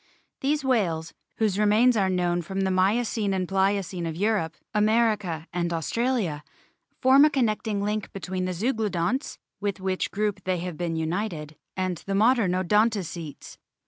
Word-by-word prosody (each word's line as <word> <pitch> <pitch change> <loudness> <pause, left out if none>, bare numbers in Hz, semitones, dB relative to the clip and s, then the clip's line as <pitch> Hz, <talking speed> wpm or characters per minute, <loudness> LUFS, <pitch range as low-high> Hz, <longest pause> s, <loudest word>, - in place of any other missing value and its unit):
These 290 +2 0
whales, 175 -11 0 0.2
whose 210 -3 +1
remains 215 +4 +4
are 195 -3 +2
known 175 -1 +1
from 190 +3 -3
the 190 0 +1
Miocene 205 +2 +1
and 185 -1 -1
Pliocene 190 -2 0
of 160 - -4
Europe, 195 -4 0 0.2
America, 210 -6 +1
and 175 -1 -1
Australia, 175 - -1 0.6
form 265 +2 +6
a 305 - +6
connecting 220 -6 0
link 210 0 -2
between 185 -1 -4
the 185 - -2
Zeuglo 220 +3 0
donts 200 - -1 0.2
(with 200 -1 -2
which 190 0 -1
group 210 0 -2
they 185 -1 0
have 175 -1 -5
been 170 0 -2
united) 160 -2 -3 0.2
and 185 -2 -1
the 195 - 0
modern 220 -3 +3
Odontocetes. 185 -4 -1
195 Hz, 150 wpm, -26 LUFS, 175-220 Hz, 0.6 s, form